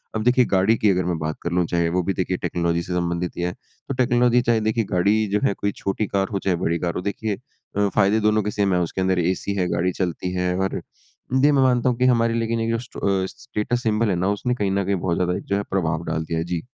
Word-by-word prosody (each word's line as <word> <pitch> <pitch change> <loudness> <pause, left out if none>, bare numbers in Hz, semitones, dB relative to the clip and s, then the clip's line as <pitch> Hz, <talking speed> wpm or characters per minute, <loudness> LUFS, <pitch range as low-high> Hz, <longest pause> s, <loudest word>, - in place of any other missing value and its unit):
अब 110 - -1
देखिए 125 0 +4
गाड़ी 95 +4 +4
की 105 - +3
अगर 90 -1 0
मैं 90 -2 -1
बात 80 0 -2
कर 85 - -3
लूँ, 90 0 +2
चाहे 85 0 0
वो 90 +2 0
भी 95 - 0
देखिए 95 -1 -1
टेक्नोलॉजी 85 0 -1
से 90 - -5
संबंधित 85 0 -1
ही - - -2
है। 90 - 0
तो 140 - -10
टेक्नोलॉजी 125 -1 +3
चाहे 120 -2 +2
देखिए 110 +1 +1
गाड़ी 95 +3 +3 0.2
जो 105 - +2
है - - +2
कोई 100 +1 -2
छोटी 100 +1 -1
कार 95 -1 0
हो 100 - 0
चाहे 95 -2 0
बड़ी 85 +1 +1
कार 85 -1 -1
हो - - -2
देखिए 105 0 -3 0.4
अ, 100 0 +3
फ़ायदे 105 +2 +3
दोनों 110 -1 +3
के 105 - -2
सेम 100 -2 +1
है। 90 - +2
उसके 85 +2 -2
अंदर 95 -1 +1
एसी 95 +2 -1
है, 90 -2 0
गाड़ी 90 +2 +1
चलती 90 0 -2
है। 90 0 0
और 95 0 -1 0.7
ये 150 - +6
मैं 140 -2 +3
मानता 125 -1 +3
हूँ 120 - -1
कि 125 - +2
हमारे 115 0 +1
लेकिन 115 0 -1
एक 115 - -1
जो 115 - +1
स्ट - - -13 0.4
स्टेटस 120 -1 -2
सिंबल 110 0 +1
है 95 - +1
ना 90 +2 0
उसने 125 +2 -1
कहीं 100 -4 -1
न 100 0 +1
कहीं 100 0 +1
बहुत 85 -1 -1
ज़्यादा 90 0 0
एक - - -7
जो 100 - -1
है 100 - 0
प्रभाव 85 -4 -1
डाल 80 - -2
दिया 80 0 -2
है। 80 - -2
जी। 85 -2 -3
95 Hz, 270 wpm, -23 LUFS, 90-110 Hz, 0.7 s, ये